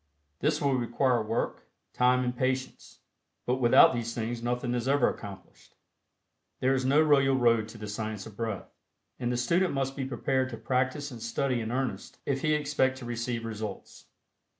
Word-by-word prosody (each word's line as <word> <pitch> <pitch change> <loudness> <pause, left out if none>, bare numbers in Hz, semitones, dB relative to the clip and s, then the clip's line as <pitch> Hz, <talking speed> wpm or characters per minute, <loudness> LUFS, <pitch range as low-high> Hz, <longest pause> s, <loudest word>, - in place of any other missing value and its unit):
This - - +1
will 140 -2 +1
require 125 0 +1
work, 110 +2 -3 0.3
time 125 +1 +3
and 125 0 -2
patience, 130 +1 -3 0.4
but 125 +1 +1
without 120 +1 +7
these 115 -1 -3
things 115 0 -3
nothing 120 +1 -1
is 120 0 -2
ever 140 -2 +4
accomplished. 100 -3 -8 0.8
There 130 +1 +2
is 130 -1 0
no 135 +4 +4
royal 135 -3 +4
road 115 -4 +3
to 115 - -11
the 105 -1 -7
Science 105 -1 -4
of 110 - -11
Breath, 110 -3 -4 0.5
and 120 -1 -1
the 125 - 0
student 170 +7 +1
must 135 0 -1
be 135 - -3
prepared 130 0 0
to 115 - -6
practice 130 +5 -1
and 120 -2 -9
study 125 +1 -1
in 110 0 -4
earnest 125 -6 -3
if 135 -1 -1
he 155 -1 +2
expect 140 -3 +1
to 130 - -8
receive 120 0 -3
results. 110 -1 -7
125 Hz, 175 wpm, -29 LUFS, 115-135 Hz, 0.8 s, without